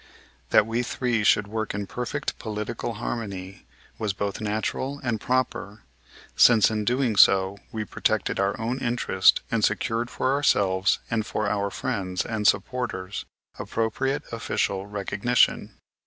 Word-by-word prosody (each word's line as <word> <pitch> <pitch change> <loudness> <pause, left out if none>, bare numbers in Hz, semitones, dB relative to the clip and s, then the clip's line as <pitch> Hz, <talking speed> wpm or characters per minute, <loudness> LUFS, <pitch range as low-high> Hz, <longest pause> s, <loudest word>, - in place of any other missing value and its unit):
That - - +5
we 115 +2 -1
three 120 -2 -1
should 105 0 +4
work 110 0 -3
in 100 0 -3
perfect 125 +7 -4
political 105 +1 -4
harmony 100 -4 -5 0.3
was 105 -3 -1
both 100 +1 -3
natural 110 +6 -2
and 115 -4 -1
proper, 125 -5 -2 0.5
since, 115 -3 +6
in 105 -1 -2
doing 125 -1 +1
so, 95 0 +5
we 110 -1 -3
protected - - -1
our 100 +2 0
own 120 +4 -2
interests 120 -6 +3
and 115 -2 +1
secured 115 +3 0
for 130 - 0
ourselves, 100 -8 +2
and 115 -1 +1
for 110 -1 -2
our 100 -1 0
friends 95 -6 -3
and 110 -2 0
supporters, 100 -2 -1 0.3
appropriate 130 +6 -1
official 100 -4 -1
recognition. 105 +3 +1
110 Hz, 135 wpm, -25 LUFS, 100-120 Hz, 0.5 s, since